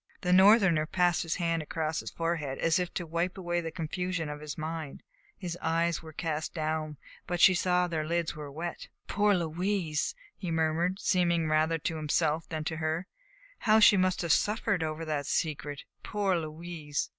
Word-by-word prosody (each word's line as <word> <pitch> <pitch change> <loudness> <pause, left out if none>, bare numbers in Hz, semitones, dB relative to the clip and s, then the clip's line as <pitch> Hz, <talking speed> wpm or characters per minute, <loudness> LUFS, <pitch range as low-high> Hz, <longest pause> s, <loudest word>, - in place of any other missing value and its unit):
The 180 0 +2
Northerner 190 -5 +6
passed 175 0 +2
his 165 -1 -2
hand 165 -2 0
across 155 +1 -2
his - - -5
forehead 165 -5 -2
as 165 +2 +2
if 180 -1 -2
to 175 - -2
wipe 170 +3 -2
away 175 -2 -1
the 165 - -4
confusion 165 0 -3
of 150 0 -6
his 150 -1 -6
mind. 155 -2 -5 0.3
His 175 -2 -5
eyes 165 0 +1
were 160 -1 -10
cast 160 0 -3
down, 155 -1 -2 0.3
but 175 0 -2
she 185 - +8
saw 180 0 +2
that 175 - -3
their 155 - 0
lids 170 0 -1
were 150 -2 -7
wet. 170 +4 -5 0.2
"Poor 205 0 +2
Louise!" 175 - -1 0.2
he 180 - -5
murmured, 165 +3 +1
seemingly 170 -3 +2
rather 155 +1 +2
to 160 +1 -3
himself 155 +1 0
than 155 -1 -3
to 160 +1 -3
her; 160 +2 -1 0.5
"how 220 -1 +4
she 210 - +8
must 185 -1 +1
have 170 - 0
suffered 205 -1 +2
over 160 +1 -3
that 145 -3 -2
secret. 145 -3 -2 0.2
Poor 200 -3 0
Louise!" 155 -2 -4
165 Hz, 180 wpm, -29 LUFS, 155-180 Hz, 0.5 s, she